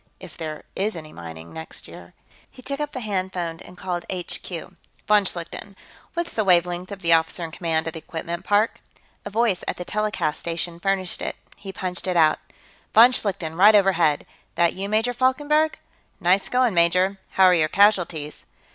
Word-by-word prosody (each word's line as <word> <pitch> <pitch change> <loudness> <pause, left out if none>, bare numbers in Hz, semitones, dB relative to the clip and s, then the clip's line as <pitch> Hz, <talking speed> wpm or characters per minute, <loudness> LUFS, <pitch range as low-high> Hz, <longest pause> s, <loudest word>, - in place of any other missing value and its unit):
If - - -11
there 155 -2 -6
is 205 +2 -1
any 155 -2 -9
mining, 80 -1 -10
next 160 0 -7
year. - - -13 0.3
He 255 - -15
took 280 +2 -4
up 295 -1 -3
the 255 - -6
hand 190 -4 -2
phone 170 -2 -4
and 180 - -13
called 175 -2 -3
HQ. 180 -2 -5 0.6
"Von 210 -1 +5
Schlichten, 185 +2 -4 0.4
what's 340 0 -2
the 220 - 0
wavelength 180 0 +2
of 195 -2 -8
the 170 0 +4
officer 165 +2 +1
in 165 - -5
command 160 -2 -1
at 160 - -4
the 160 - -6
equipment 170 +2 -6
park?" 210 +2 +1 0.4
A - - -4
voice 215 -3 +1
at - - -2
the 180 - -6
telecast 210 -8 -1
station 170 0 -4
furnished 190 0 -1
it; - - -3 0.2
he 195 - -8
punched 185 -1 -5
it 180 -1 0
out. 155 -2 +4 0.6
"Von 235 +3 +9
Schlichten, 185 -9 -1
right 205 +5 +7
overhead. 175 -7 +3 0.3
That 170 0 +3
you, 195 +2 -5
Major 220 +3 +1
Falkenberg? 295 +5 +2 0.4
Nice 185 +3 +2
going, 250 -3 +2
major, 180 +3 +3
how 190 - +4
are 185 -1 +7
your 160 -3 +3
casualties?" 175 -7 +2
185 Hz, 180 wpm, -23 LUFS, 170-210 Hz, 0.6 s, Von